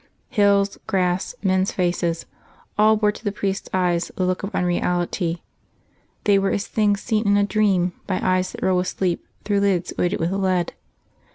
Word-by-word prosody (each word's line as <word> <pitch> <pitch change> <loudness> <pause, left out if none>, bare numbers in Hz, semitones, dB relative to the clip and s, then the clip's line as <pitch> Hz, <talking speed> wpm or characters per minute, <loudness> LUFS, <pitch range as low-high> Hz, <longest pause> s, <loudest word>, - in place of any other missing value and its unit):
Hills, 200 -2 +2
grass, 185 +3 0
men's 190 0 +2
faces 175 -2 -1 0.5
all 215 +1 +5
bore 210 -1 +2
to 210 - -13
the 205 - 0
priest's 195 -1 -3
eyes 175 -2 0
the 185 - 0
look 185 0 0
of 195 - -5
unreality; 175 -1 0 0.8
they 200 -1 +4
were 195 0 +1
as 200 - -1
things 205 -2 +1
seen 220 -2 0
in 205 0 +4
a 205 - +4
dream 195 -3 +2
by 185 - 0
eyes 185 0 +1
that - - -7
roll 185 -1 +3
with 180 0 0
sleep 180 -3 -2 0.2
through 205 -1 +2
lids 195 -3 +1
weighted 180 +3 +1
with 165 +2 0
lead. 185 -3 0
190 Hz, 175 wpm, -22 LUFS, 180-205 Hz, 0.8 s, all